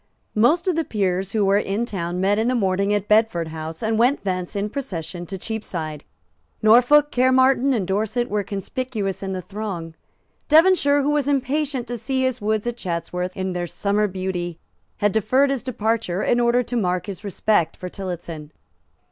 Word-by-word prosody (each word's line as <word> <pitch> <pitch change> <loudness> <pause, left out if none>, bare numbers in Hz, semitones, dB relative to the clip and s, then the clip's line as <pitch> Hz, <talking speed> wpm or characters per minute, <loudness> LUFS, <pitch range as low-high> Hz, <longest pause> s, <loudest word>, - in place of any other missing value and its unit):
Most 300 - +3
of 365 - +2
the 330 - +1
peers 195 - -1
who 215 -3 +2
were 200 +1 +4
in 210 +3 -1
town 180 -5 -3
met 200 +3 +2
in 225 - +1
the 255 - +1
morning 200 -2 +1
at 205 -1 0
Bedford 210 -7 +2
House, 160 +2 -6
and 220 0 +1
went 250 +5 +3
thence 185 0 -3
in 200 +1 -1
procession 175 - -5
to 190 - -5
Cheapside. 170 -8 -5 0.6
Norfolk, 250 +7 +6
Caermarthen 260 +1 +4
and 220 -7 0
Dorset 215 +5 -1
were 210 -3 -1
conspicuous 205 0 -4
in 190 -1 -3
the 185 -1 -4
throng. 190 -6 -5 0.6
Devonshire, 310 -3 +5
who 290 - +1
was 295 -2 +1
impatient 275 -1 0
to 240 -1 -5
see 260 +3 -1
his 260 -2 -1
woods 215 +1 0
at 240 0 -3
Chatsworth 180 -1 -4
in 190 -1 -2
their 175 0 -3
summer 205 +4 0
beauty, 185 -3 -4 0.4
had 205 -1 +2
deferred 255 +7 +2
his 270 -3 -1
departure 220 -6 -1
in 240 - +2
order 240 +1 +3
to 245 - -5
mark 180 -5 0
his 200 0 -7
respect 200 -4 +1
for 180 - -6
Tillotson. 170 -5 -6
210 Hz, 180 wpm, -22 LUFS, 185-245 Hz, 0.6 s, Norfolk